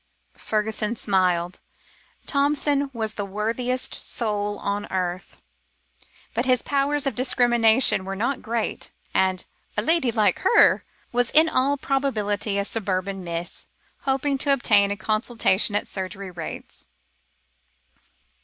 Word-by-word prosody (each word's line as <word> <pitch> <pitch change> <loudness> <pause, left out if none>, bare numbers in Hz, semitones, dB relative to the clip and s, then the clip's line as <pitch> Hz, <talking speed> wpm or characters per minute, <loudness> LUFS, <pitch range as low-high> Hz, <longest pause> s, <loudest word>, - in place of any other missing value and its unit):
Fergusson 215 +1 -1
smiled. 180 -4 0 0.7
Thompson 285 0 +1
was 220 -3 -3
the 205 - -3
worthiest 225 +6 -2
soul 205 -3 -2
on 205 +1 -3
earth, 185 0 -3 1.0
but 235 +3 -1
his 255 -1 +3
powers 285 +1 +1
of 275 - 0
discrimination 240 -4 +3
were 195 +1 -5
not 240 +7 -1
great, 230 0 -3 0.2
and 185 -1 +1 0.3
a 210 - +1
"lady 320 -2 +2
like 215 -2 +2
her" 475 - +4 0.3
was 245 -1 +1
in 315 +1 +5
all 280 -1 +1
probability 215 -8 -1
a 200 - 0
suburban 195 -3 -2
"Miss," 170 0 -5 0.3
hoping 270 +1 0
to 280 - +1
obtain 210 -7 +4
a 205 - -2
consultation 215 -1 +1
at 205 - -1
surgery 190 0 -5
rates. 170 -3 -7
220 Hz, 120 wpm, -24 LUFS, 200-260 Hz, 1.0 s, in